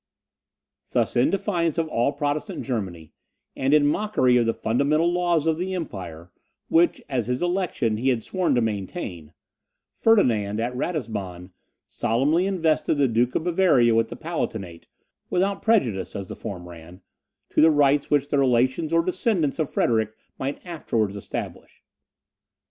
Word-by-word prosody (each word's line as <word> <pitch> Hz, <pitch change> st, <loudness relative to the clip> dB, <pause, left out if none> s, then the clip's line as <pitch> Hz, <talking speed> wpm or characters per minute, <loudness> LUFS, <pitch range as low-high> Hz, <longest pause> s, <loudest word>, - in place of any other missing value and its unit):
Thus, -, -, +1 dB
in 120 Hz, -, +4 dB
defiance 175 Hz, -5 st, -1 dB
of 165 Hz, -1 st, 0 dB
all 120 Hz, +2 st, +1 dB
Protestant 145 Hz, 0 st, -3 dB
Germany, 95 Hz, -, -4 dB, 0.4 s
and 135 Hz, +1 st, 0 dB
in 150 Hz, -1 st, +5 dB
mockery 145 Hz, -6 st, +2 dB
of 120 Hz, -2 st, +3 dB
the 115 Hz, -, +2 dB
fundamental 150 Hz, +9 st, +1 dB
laws 175 Hz, -3 st, +1 dB
of 160 Hz, 0 st, +1 dB
the 185 Hz, +1 st, -2 dB
empire, 90 Hz, -, -7 dB, 0.4 s
which, 170 Hz, +1 st, +3 dB
as 125 Hz, -5 st, -2 dB
his 125 Hz, +5 st, -1 dB
election, 175 Hz, -, 0 dB
he 130 Hz, +4 st, +1 dB
had 120 Hz, -4 st, 0 dB
sworn 185 Hz, -6 st, 0 dB
to 120 Hz, -, +2 dB
maintain, 100 Hz, -, -4 dB, 0.6 s
Ferdinand 110 Hz, -, +2 dB
at 120 Hz, +2 st, -2 dB
Ratisbon 100 Hz, -, -4 dB, 0.3 s
solemnly 150 Hz, +11 st, +1 dB
invested 165 Hz, -6 st, +1 dB
the 140 Hz, -2 st, +3 dB
Duke 120 Hz, +1 st, +1 dB
of -, -, 0 dB
Bavaria 170 Hz, -10 st, +3 dB
with 115 Hz, 0 st, +2 dB
the 120 Hz, -, -8 dB
Palatinate, 110 Hz, -, -5 dB, 0.4 s
without 195 Hz, +2 st, 0 dB
prejudice, 120 Hz, -, +1 dB
as 100 Hz, -2 st, -6 dB
the -, -, -6 dB
form 90 Hz, -3 st, -7 dB
ran, 85 Hz, +2 st, -13 dB, 0.5 s
to -, -, +3 dB
the 160 Hz, -, +7 dB
rights 145 Hz, -2 st, +3 dB
which 145 Hz, -1 st, +1 dB
the 145 Hz, -, +1 dB
relations 130 Hz, +4 st, +2 dB
or 165 Hz, 0 st, +3 dB
descendants 185 Hz, -, 0 dB
of 155 Hz, -, 0 dB
Frederick 110 Hz, -2 st, 0 dB, 0.2 s
might 135 Hz, +6 st, -4 dB
afterwards 115 Hz, -, -2 dB
establish. 100 Hz, -, -7 dB
135 Hz, 150 wpm, -24 LUFS, 110-165 Hz, 0.6 s, the